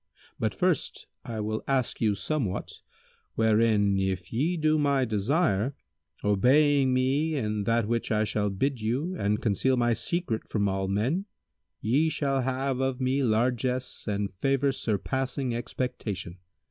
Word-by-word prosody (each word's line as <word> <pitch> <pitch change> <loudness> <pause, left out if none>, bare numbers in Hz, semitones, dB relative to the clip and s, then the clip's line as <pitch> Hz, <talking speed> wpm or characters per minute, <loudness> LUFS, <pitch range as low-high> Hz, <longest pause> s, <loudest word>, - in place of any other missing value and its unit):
But - - -1
first - - 0 0.2
I 115 -2 -5
will 110 +1 -2
ask 135 -3 0
you 105 -3 +2
somewhat, 100 -1 -3 0.6
wherein 110 -3 +3
if 95 -1 -2
ye 160 +10 +1
do 155 0 +2
my 140 -3 +2
desire, 120 - +1 0.5
obeying 135 +7 +4
me 135 +5 +1
in 105 -6 -1
that 115 -1 +2
which 115 0 -1
I 110 0 +2
shall 105 -1 0
bid 125 +6 -1
you 135 +12 -1
and 105 - 0
conceal 125 +5 +2
my 120 -1 +3
secret 155 -4 -2
from 100 -2 +1
all 95 0 -1
men, 120 - 0 0.6
ye 140 +9 +2
shall 135 -3 0
have 130 +1 -1
of 130 -1 -1
me 130 +2 +1
largesse 125 +2 0
and 100 -1 -1
favour 135 +7 +1
surpassing 130 +3 -2
expectation. 115 -7 -4
120 Hz, 140 wpm, -27 LUFS, 105-135 Hz, 0.6 s, obeying